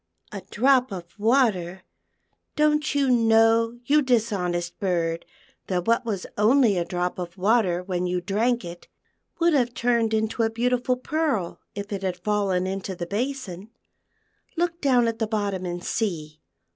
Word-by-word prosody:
" - - -53
A 200 -3 -6
drop 255 +1 +3
of 180 -3 -6
water! 205 -6 +1 0.7
don't 300 0 +2
you 275 -2 +2
know, 225 0 +3
you 300 +3 +4
dishonest 195 -9 -1
bird, 170 -3 -1 0.4
that 180 -2 -1
what 230 +1 +2
was 205 -5 -3
only 225 0 +4
a 175 - 0
drop 180 +1 -3
of 175 +1 -6
water 190 -3 +2
when 180 -1 -2
you 180 0 -1
drank 215 +5 0
it, 175 0 -10 0.5
would 340 -1 +3
have 245 -4 +1
turned 235 -2 +1
into 220 +1 -1
a 225 - +2
beautiful 250 +2 0
pearl 265 - -2 0.2
if 205 +1 -5
it 195 - -3
had 185 -2 -2
fallen 195 -1 0
into 190 0 -4
the 175 - -5
basin. 215 -2 -4 0.9
Look 345 0 -1
down 250 -4 +3
at 230 -1 -3
the 220 - 0
bottom 200 -4 -2
and 175 0 -5
see. 155 -8 -3
215 Hz, 160 wpm, -24 LUFS, 180-245 Hz, 0.9 s, you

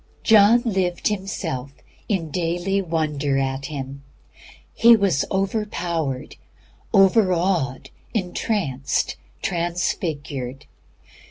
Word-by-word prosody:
John 220 +2 +6
lived 185 -5 0
himself 180 -9 -4 0.4
in 170 -7 -1
daily 175 +4 0
wonder 150 -5 -1
at 135 0 -1
Him; 140 -2 -6 0.7
he 235 +1 +7
was 195 -9 +1
overpowered, 175 - -2 0.5
over 195 -1 +5
awed, 170 -7 -1 0.2
entranced, 180 - -1 0.3
transfigured. 150 -6 -2
175 Hz, 80 wpm, -23 LUFS, 140-195 Hz, 0.7 s, he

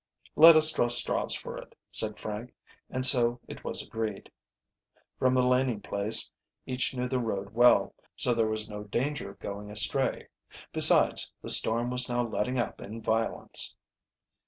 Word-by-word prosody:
"Let 165 +1 +9
us 155 0 +5
draw 120 - +1
straws 120 - +2
for - - -7
it," - - -15
said 110 -1 -3
Frank, 110 +3 -7 0.3
and 130 0 -1
so 120 -2 +4
it - - -10
was - - -1
agreed. 110 -3 -5 0.9
From 130 0 +2
the 125 -1 +2
Laning 125 -3 +1
place 100 +2 0 0.3
each 130 +1 -2
knew 125 0 -2
the 130 0 -1
road 100 -4 -4
well, 120 +1 +4 0.2
so 125 - +1
there 115 -1 +1
was 110 -1 -3
no 105 -1 -8
danger 120 +2 -3
of 100 - -14
going 100 +1 -7
astray. 110 +6 -1 0.4
Besides, - - +3
the - - 0
storm 120 +2 +3
was 125 0 -2
now 120 0 -1
letting 120 +3 -2
up 120 - -3
in 110 +3 -8
violence. 115 0 -1
120 Hz, 160 wpm, -28 LUFS, 110-125 Hz, 0.9 s, Let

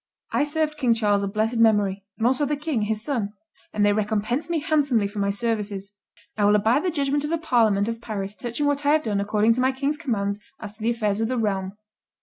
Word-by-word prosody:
I 290 - +2
served 305 0 -1
King 240 -4 +3
Charles 205 -3 +2
of 200 -1 -2
blessed 220 +3 0
memory, 205 -3 +3
and 225 - -1
also 260 +4 +3
the 295 +1 0
king, 295 -5 -2
his 215 +1 -1
son; 225 -7 -2 0.4
and 210 -1 +1
they 205 - +4
recompensed 215 +7 -1
me 340 - +1
handsomely 285 -8 +2
for 205 +1 -7
my 200 0 +1
services. 205 -2 -2 0.4
I 210 - +1
will 205 +1 +5
abide 220 +7 +3
the 370 - +1
judgment 285 -2 0
of 295 - -2
the 335 - +1
parliament 225 -10 +2
of 230 0 -4
Paris 205 -4 -4
touching 240 +6 -3
what 285 0 0
I 290 +1 +4
have 310 0 +2
done 205 -3 -1
according 210 +2 +2
to 250 - -1
my 260 +1 +3
king's 280 +3 -2
commands 205 -9 -2 0.2
as 210 -1 -7
to 215 - -8
the 225 - +1
affairs 215 -3 0
of 225 - +1
the 255 +1 -1
realm." 195 -4 -1
225 Hz, 235 wpm, -24 LUFS, 205-280 Hz, 0.4 s, will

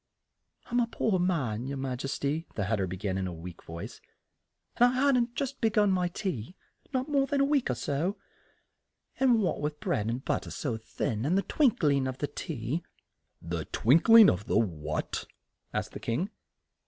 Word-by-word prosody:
"I'm 245 0 0
a 235 - +2
poor 220 -4 0
man, 135 -11 0
your 140 0 -3
ma 130 -1 -2
jes 135 0 -2
ty," 150 +4 -2
the 100 - -1
Hat 105 +3 0
ter 95 -2 -1
be 90 +1 -5
gan 95 0 -2
in 95 - -1
a - - -4
weak 85 +1 -9
voice, 85 +1 -8 0.8
"and 240 - +7
I 245 - +3
hadn't 255 -2 +4
but 235 0 -20
just 275 -1 -3
be 225 - +4
gun 205 -2 +3
my 180 -1 +2
tea, 180 - -4 0.4
not 260 -1 -1
more 280 -2 +2
than 280 +1 0
a 275 - +4
week 280 - +1
or 125 - +1
so, 145 - -1 1.0
and 250 -4 +5
what 180 - -1
with 150 0 -3
the - - -14
bread 110 -5 0
and 120 +3 -3
but - - 0
ter - - -9
so 130 -6 -3
thin 110 0 -3
and 165 +8 +2
the 195 - +2
twink 265 - +2
ling 140 -3 +3
of 130 -1 -4
the 145 - -1
tea 145 -1 -4 0.3
" - - -50
"The 85 -1 -3
twink 150 - +3
ling 225 -2 +10
of 100 +6 0
what?" 80 -8 -1 0.4
asked - - -3
the - - -7
King. 160 - -2
145 Hz, 210 wpm, -29 LUFS, -, 1.0 s, ling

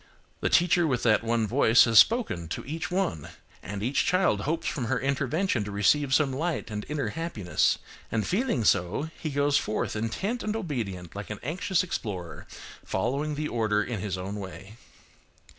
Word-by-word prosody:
The - - 0
teacher 175 -1 +4
with 130 -4 0
that 115 -1 +3
one 115 -1 +1
voice 120 0 +5
has 115 -2 +6
spoken 220 - +3
to 80 - -5
each 160 +4 -4
one; 180 - -1 0.3
and 100 +1 -5
each 130 +5 +1
child 180 - +2
hopes 160 +8 -2
from 130 - -2
her 125 +2 0
intervention 140 - 0
to - - -5
receive 130 +8 +2
some 135 -1 +3
light 160 -3 -2
and 105 0 -5
inner 145 -6 -1
happiness. 105 - 0 0.3
And 110 -2 0
feeling 210 - 0
so, 105 - +1
he 155 - -3
goes 145 0 +2
forth 110 - -2
intent 190 - -2
and 215 0 -2
obedient 110 - -4
like 100 0 -6
an 105 - -5
anxious 175 +6 0
explorer, 90 - -5 0.4
following 145 +3 -1
the 150 +1 -2
order 110 -4 +1
in 115 -3 -4
his 95 -1 -3
own 95 +3 -5
way. 95 +1 -8
125 Hz, 175 wpm, -27 LUFS, 105-160 Hz, 0.4 s, has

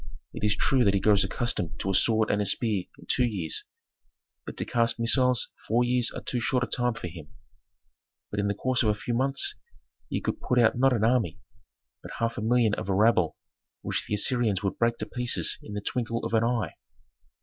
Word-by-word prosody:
It - - -7
is 105 -1 +3
true 130 +3 +2
that 100 -3 +3
he - - +2
grows 100 +1 +4
accustomed 115 -9 -2
to 95 - -1
a - - -1
sword 110 +3 +3
and 105 - +1
a - - 0
spear 105 -6 0
in - - -15
two 125 - +1
years, 100 -10 -1 0.8
but - - -7
to - - -2
cast 115 0 +1
missiles 125 +1 +3 0.2
four 120 +3 +2
years 125 -1 +1
are - - -7
too 125 - -2
short 125 +2 +1
a - - +1
time 125 -2 -1
for 90 - -6
him. 80 -3 -10 1.0
So 105 - -3
in 100 - 0
the 100 - -1
course 130 +4 0
of 110 - +2
a 105 - +2
few 105 +4 -4
months 135 - +1 0.6
ye - - -1
could - - -4
put 125 - 0
out 120 -2 +4
not 135 +2 +3
an 110 -3 0
army, 115 - +1 0.6
but - - -10
half 115 0 -1
a - - -4
million 115 -1 +2
of 100 - -4
a 95 - +1
rabble 110 +3 +3 0.5
which - - -2
the 105 - -1
Assyrians 110 -2 +1
would 100 - -2
break 115 0 +1
to - - -3
pieces 125 -1 +1
in 105 - -9
the 105 - -3
twinkle 115 +1 -2
of - - -4
an 110 0 +3
eye. 115 -8 -1
115 Hz, 220 wpm, -27 LUFS, 105-125 Hz, 1.0 s, grows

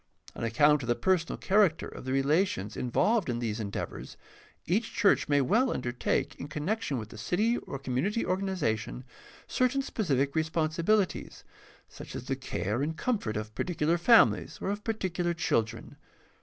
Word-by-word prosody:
On - - -6
account 145 +6 +4
of 120 - -6
the 120 - +2
personal 170 +6 +1
character 190 -5 +2
of - - -10
the 130 - -3
relations 135 - +1
involved 185 - +1
in 120 - -1
these 115 -2 -2
endeavors, 100 -2 -5 0.5
each 210 +7 0
church 205 -8 +3
may 145 -1 +4
well 230 - +3
undertake, 120 -1 -1
in - - -5
connection 155 - -2
with 110 -2 -6
the 110 - -10
city 210 - +1
or 140 - -7
community 135 - -1
organization, 180 - -1 0.4
cer 255 - +2
tain 275 +2 -1
specific 140 - 0
responsibilities, 165 +5 0 0.4
such - - -10
as - - -5
the - - -2
care 105 +7 -3
and 160 +3 -2
comfort 195 - -1
of 105 0 -5
particular 165 +5 0
families 230 +7 +4
or 195 - -2
of 205 +1 -4
particular 180 -6 -1
children. 115 -8 -1
155 Hz, 155 wpm, -29 LUFS, 125-195 Hz, 0.5 s, account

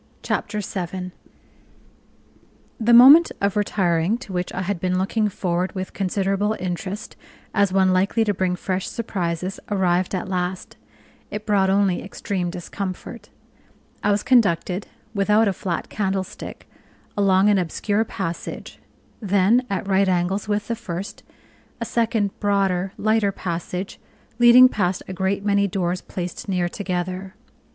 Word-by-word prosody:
Chapter 210 -1 -2
7 185 -1 -5 1.7
The 230 +1 +2
moment 275 +8 +9
of 200 -1 0
retiring, 190 -1 +1
to 240 -6 -10
which 180 0 -2
I 185 - -3
had 190 -1 -2
been 185 +1 0
looking 210 +3 0
forward 180 -1 -2
with 185 0 -5
considerable 195 +2 0
interest 185 +3 -5 0.4
as 200 -2 +2
one 190 -1 +3
likely 195 +5 +2
to 210 -2 +1
bring 185 -1 0
fresh 185 +1 -3
surprises, 185 -4 -3
arrived 185 -2 +1
at 185 - -3
last: 180 0 -3 0.5
it 210 0 -6
brought 200 -3 +2
only 195 -2 +2
extreme 195 -2 -3
discomfort. 185 +5 -6 0.7
I - - +1
was 205 0 +2
conducted 195 -6 +2 0.3
(without 210 +2 +3
a 195 - +1
flat 180 -1 -3
candlestick) 190 -2 -4 0.5
along 195 0 +4
an 205 -2 +4
obscure 205 +5 0
passage; 185 -6 -6 0.4
then, 205 +4 +3
at 195 0 -2
right 195 0 +3
angles 185 +3 0
with 205 0 -1
the 230 - -1
first, 195 -3 -6 0.6
a 230 - -3
second 225 -3 0
broader, 195 -2 +1
lighter 215 -1 +2
passage, 180 +1 -5 0.4
leading 240 +1 +9
past 185 -7 -1
a 185 - -5
great 190 +2 -1
many 200 -1 +3
doors 180 -1 -2
placed 180 +1 -6
near 180 -2 +1
together. 185 +1 -4
195 Hz, 135 wpm, -22 LUFS, 185-205 Hz, 1.7 s, moment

